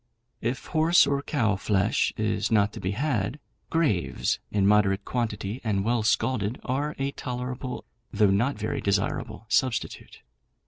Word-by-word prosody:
If 120 +3 -2
horse 160 +2 +4
or 140 0 0
cow 115 -9 0
flesh 100 0 +1
is - - 0
not 105 -2 +3
to - - -7
be 95 - -2
had, 125 -2 -1 0.3
graves, 150 - 0
in 100 -2 +1
moderate 100 -1 +3
quantity 110 -1 -3
and 100 -4 0
well 120 0 +2
scalded, 110 0 0
are 145 +4 -2
a 135 +1 -1
tolerable, 125 0 -5 0.3
though 105 -3 +3
not 120 +8 +1
very 110 +1 -2
desirable, 100 +2 -1
substitute. 125 +1 -1
115 Hz, 140 wpm, -26 LUFS, 100-130 Hz, 0.3 s, horse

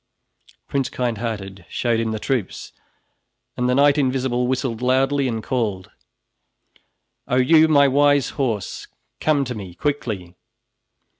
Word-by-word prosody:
Prince 135 -2 -1
Kindhearted 110 -6 -4
showed 120 -2 0
him 115 -1 -1
the 110 - -2
troops, 115 -3 -3 0.8
and 125 0 0
the 125 - +2
Knight 145 +2 +4
Invisible 130 -2 0
whistled 125 -2 -2
loudly 135 +2 +2
and 115 -3 -3
called: 105 -7 -2 1.4
"Oh - - 0
you, 155 +5 +5
my 140 -2 +5
wise 145 0 +3
horse, 115 -9 -3 0.3
come 145 -3 +1
to 125 - -4
me 95 -6 -8
quickly!" 110 -12 -3
125 Hz, 125 wpm, -21 LUFS, 110-140 Hz, 1.4 s, you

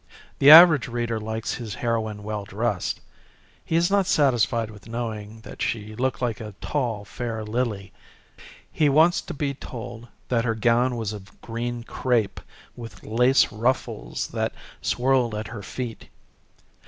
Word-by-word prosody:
The 140 - +7
average 160 -3 +10
reader 120 -2 -2
likes 110 +1 -3
his 110 -5 -6
heroine 110 -3 -2
well 105 -1 -4
dressed. 105 0 -2 0.6
He 160 - -2
is 170 +3 +3
not 200 -2 +3
satisfied 115 -5 +2
with 105 +1 -14
knowing 110 -2 -5
that - - -11
she 110 -1 -2
looked 130 +3 -2
like 115 -3 -1
a 105 -3 -8
tall, 120 -8 -2
fair 115 -1 -5
lily. 105 -3 -3 0.8
He 150 -2 +2
wants 160 +5 +4
to - - -8
be 140 -1 -1
told 120 -3 -8 0.2
that 115 -2 +2
her 115 -2 0
gown 120 +3 +2
was 110 -2 -3
of 100 -2 -12
green 120 +1 -4
crepe, 115 -4 0 0.4
with 115 -6 -10
lace 125 +4 +3
ruffles 110 - -2
that - - -2 0.3
swirled 125 -3 +1
at 105 +1 -5
her 110 -3 -7
feet. 120 +2 -6
115 Hz, 150 wpm, -24 LUFS, 110-125 Hz, 0.8 s, average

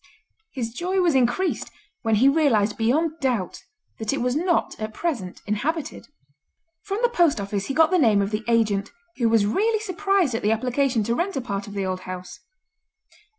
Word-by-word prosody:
His 230 -4 -4
joy 365 +7 -1
was 350 -3 +3
increased 265 +9 +1 0.3
when 225 -1 +1
he 245 +6 +4
realised 265 -9 +3
beyond 310 +8 0
doubt 240 -9 -1 0.4
that 220 -1 -1
it 275 - -1
was 250 +1 0
not 345 +2 0
at 215 0 -5
present 240 - -3
inhabited. 280 +10 -3 0.7
From 395 0 -4
the - - +6
post 340 - +2
office 200 0 -3
he 275 - -3
got 320 +1 +4
the 365 - +3
name 220 -8 +4
of 200 +1 0
the 210 +1 -2
agent, 215 -3 +1 0.3
who 235 -3 +2
was 225 -2 +3
rarely 430 - +1
surprised 390 - 0
at 225 - -2
the 210 - +1
application 250 +1 +1
to 235 - 0
rent 360 +9 -1
a 270 - -1
part 200 -4 -4
of 205 - -9
the 200 -1 -2
old 185 0 -2
house. 185 0 -8
245 Hz, 190 wpm, -24 LUFS, 210-325 Hz, 0.7 s, the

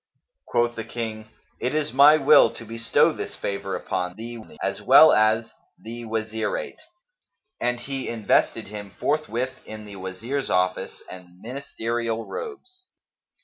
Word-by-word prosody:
Quoth 120 0 +1
the 115 - -4
King, 110 -1 -6 0.3
"It 130 +4 -1
is 155 -1 -1
my 145 +3 +8
will 140 -2 +6
to 115 - -9
bestow 115 +1 +2
this - - -6
favour 100 -1 -3
upon 90 -1 -3
thee, 115 +2 -7 0.2
as - - -2
well - - +8
as 110 +1 +2 0.2
the 115 +1 -8
Wazirate;" 110 - -3 0.8
and 120 0 0
he 135 +1 -4
invested 110 -4 +1
him 105 -1 -7
forthwith 130 -4 -1
in 110 0 -9
the 100 -1 -10
Wazir's 105 +9 -4
office 90 0 -1
and 90 -1 -12
ministerial 115 -2 -3
robes. 370 -5 -8
115 Hz, 135 wpm, -24 LUFS, 105-130 Hz, 0.8 s, my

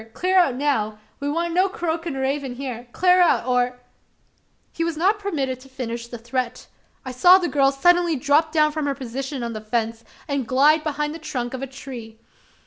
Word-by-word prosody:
Clar 370 +1 0
out 275 -9 +3
now! 250 -7 0 0.2
We 285 - -2
want 335 +3 -1
no 370 +3 +3
croakin' 335 -6 -3
raven 265 -1 -2
hyar. 250 -2 -6
Clar 365 +4 +4
out! 340 -8 +3
or 250 0 0 0.5
" - - -42
He 330 - -2
was 335 -2 -2
not 395 +6 +2
permitted 275 -11 -2
to 270 +1 -16
finish 235 -2 -5
the 240 - -8
threat. 245 +1 -3 0.4
I 260 - -4
saw 355 +9 +7
the 360 -2 -1
girl 275 -3 +3
suddenly 345 +3 +3
drop 295 +4 +2
down 305 -1 +3
from 300 -1 -2
her 280 - -1
position 265 +1 -5
on 235 0 -3
the 215 - -6
fence, 225 +1 -2 0.2
and 280 -4 -2
glide 295 +5 +4
behind 300 0 -2
the 330 - -8
trunk 245 -6 -4
of 260 - -5
a 270 - -3
tree. 250 -4 -9
275 Hz, 200 wpm, -23 LUFS, 250-320 Hz, 0.5 s, saw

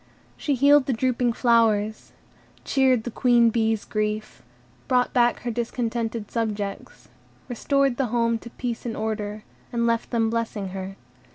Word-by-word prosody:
She 285 - -1
healed 280 +1 +5
the 265 - +1
drooping 245 0 0
flowers, 220 -3 +2 0.5
cheered 260 -4 +2
the 240 - -5
Queen 240 -1 +4
Bee's 220 -1 0
grief, 215 0 -3 0.5
brought 250 -1 +2
back 240 -1 +2
her 240 - -3
discontented 230 -2 -3
subjects, 210 -3 -4 0.4
restored 275 +1 +1
the 270 - 0
home 230 0 +1
to 235 - -10
peace 240 -1 -5
and 230 -2 -4
order, 215 -1 -3 0.3
and 235 -1 0
left 230 -1 0
them 225 -2 +1
blessing 225 -4 -2
her. 190 +1 -6
230 Hz, 145 wpm, -24 LUFS, 220-245 Hz, 0.5 s, healed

